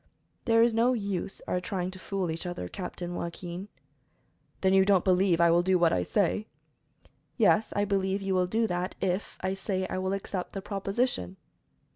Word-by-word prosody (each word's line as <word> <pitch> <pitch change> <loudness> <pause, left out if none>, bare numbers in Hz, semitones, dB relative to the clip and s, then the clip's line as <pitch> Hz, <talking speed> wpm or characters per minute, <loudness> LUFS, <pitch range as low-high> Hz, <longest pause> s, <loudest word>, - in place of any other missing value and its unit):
"There 230 -1 +5
is 235 -1 +3
no 235 +3 +3
use 200 -4 -3
our 180 - 0
trying 185 -1 -3
to 185 - -10
fool 190 -3 -2
each 165 +3 -4
other, 175 - -4
Captain 175 - -6
Joaquin." 175 +2 -5 0.9
"Then 190 0 +3
you 190 0 +6
don't 190 -2 +3
believe 185 -1 +4
that 170 - +3
I 170 - +5
will 170 +1 +5
do 185 +1 +3
what 170 -2 +3
I 90 - +2
say?" 205 - 0 0.9
"Yes, 215 -1 +4
I 205 - +2
believe 195 -1 0
you 195 -1 -2
will 180 -1 +2
do 225 +5 +1
that, 180 -2 -2
if 190 +1 -2
I 190 +1 -1
say 190 -1 -2
I - - -1
will 190 +1 -1
accept 195 -2 -4
the 195 - -4
proposition." 195 - -1
190 Hz, 190 wpm, -28 LUFS, 180-200 Hz, 0.9 s, you